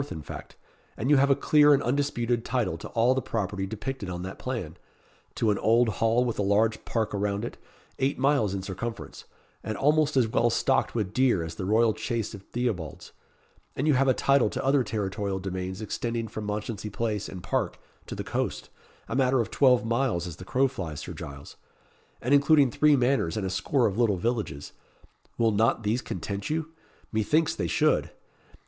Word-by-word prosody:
in 80 -4 -6
fact - - -9 0.4
and 130 +6 0
you 145 - +7
have 140 +1 +4
a 135 - +5
clear 150 +1 +5
and 140 - -1
undisputed 120 -3 0
title 115 -11 -1
to 85 - -8
all 120 +2 +3
the 130 - -1
property 95 -4 -3
depicted 110 0 -5
on 90 0 -5
that 95 +1 -7
plan 115 -11 -4 0.6
to 110 - +2
an 100 - -1
old 115 +1 +3
hall 115 +2 +3
with 120 -3 -2
a - - +3
large 105 +3 +2
park 110 -2 -1
around 100 +1 -1
it, - - -6 0.4
eight 135 +1 +1
miles 130 -8 +2
in 95 - -4
circumference, 110 +5 -6 0.4
and 110 -1 -4
almost 150 0 +2
as 125 -3 +4
well 120 +2 +2
stocked 130 +3 +1
with 105 -4 -2
deer 125 -9 +3
as 80 -1 -6
the 90 - -5
royal 110 +2 +3
chase 115 0 -3
of 100 - -8
Theobald's; 100 - -4 0.6
and 140 - -1
you 150 - +5
have 135 +1 +3
a 130 - +5
title 135 -5 +3
to - - -4
other 135 -1 +3
territorial 100 -3 -2
domains 95 +1 -4
extending 115 +1 -3
from 110 0 -6
Mounchensey 105 0 -4
Place 105 0 -2
and 90 -2 -8
Park - - -1 0.3
to - - -5
the - - -4
coast, - - -3 0.4
a - - -3
matter 130 -1 +3
of 115 - -1
twelve 125 -3 +4
miles 115 -6 0
as 85 -2 -7
the 90 - -10
crow 130 +6 +2
flies, 85 - -6
Sir - - -7
Giles, 70 0 -9 0.7
and 125 +4 +2
including 145 -2 +5
three 150 +4 +4
manors 125 -10 +1
and 105 - -2
a 95 - -2
score 115 +7 +1
of 100 +2 -1
little 110 -5 +3
villages. 105 - -3 0.6
Will 115 -1 +3
not 110 +2 +2
these 110 +4 0
content 100 +2 -5
you? 160 +1 -2 0.4
Methinks 130 +9 +2
they - - -2
should. - - +2
115 Hz, 195 wpm, -27 LUFS, 100-130 Hz, 0.7 s, you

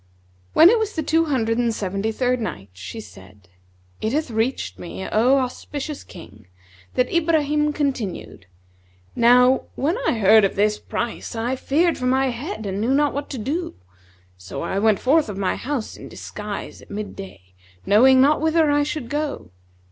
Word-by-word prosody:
When 335 +4 +8
it 465 - +3
was 440 -1 -2
the 315 - -1
Two 325 +2 +2
Hundred 230 -6 0
and 235 -1 +2
Seventy 200 +1 -2
third 250 +1 0
Night, 100 - -6
She 100 - -8
said, 95 - -14 0.5
It 220 - -1
hath 305 -3 -1
reached 220 - -2
me, 90 +1 -7
O 245 +6 +3
auspicious 275 +3 -4
King, 95 +2 -14 0.5
that 250 0 +1
Ibrahim 300 -3 +2
continued, 250 - -4 0.7
"Now 250 +2 +5
when 320 - 0
I - - +3
heard 220 -1 +5
of 195 - +1
this 210 +1 +1
price 235 0 -4
I 235 +3 -1
feared 325 +6 +1
for 250 - -1
my 265 +1 +2
head 245 - -6
and 195 +1 -3
knew 250 +5 +2
not 290 0 +2
what 285 +1 -4
to 270 - -5
do: 295 +10 -3 0.6
so 95 +1 -7
I 195 - -1
went 215 -1 +3
forth 295 0 +2
of 200 - -6
my 195 -2 0
house 260 -4 -4
in - - -11
disguise 210 -1 -7
at - - -17
mid 205 0 -6
day, 95 - -11 0.3
knowing 260 +6 +6
not 285 +3 +4
whither 320 -1 +3
I 290 0 +3
should 290 -3 -3
go. 290 - -4
245 Hz, 175 wpm, -22 LUFS, 205-290 Hz, 0.7 s, When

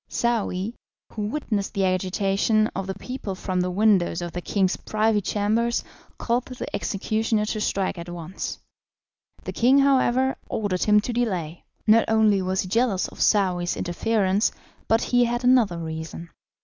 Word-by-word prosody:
Saouy, 225 -3 -1 0.4
who 210 -2 -3
witnessed 215 -6 -3
the 195 -1 +2
agitation 195 +3 +1
of 190 0 -3
the 190 - -3
people 250 -7 -6
from 185 -1 -2
the 180 - -1
windows 190 -3 +2
of 175 - -5
the 175 - -5
king's 190 0 +1
privy 215 0 0
chambers, 220 +4 0 0.3
called 245 +1 -1
to 255 - -8
the - - -5
executioner 215 +2 -1
to 215 0 -3
strike 195 -3 -1
at 170 +1 -7
once. 175 +1 -6 0.9
The - - -5
king, 255 +4 +4
however, 265 -1 +3
ordered 200 -4 -1
him 210 0 +5
to 240 - -4
delay; 180 -9 -2 0.2
not 225 +1 +5
only 220 -3 +3
was 185 +1 0
he 185 - -6
jealous 225 -1 +1
of - - -10
Saouy's 180 -4 +2
interference, 200 +2 +1 0.4
but 225 +1 +2
he 245 -1 +3
had 240 +1 -2
another 245 -8 +4
reason. 160 +1 -6
205 Hz, 160 wpm, -24 LUFS, 185-230 Hz, 0.9 s, him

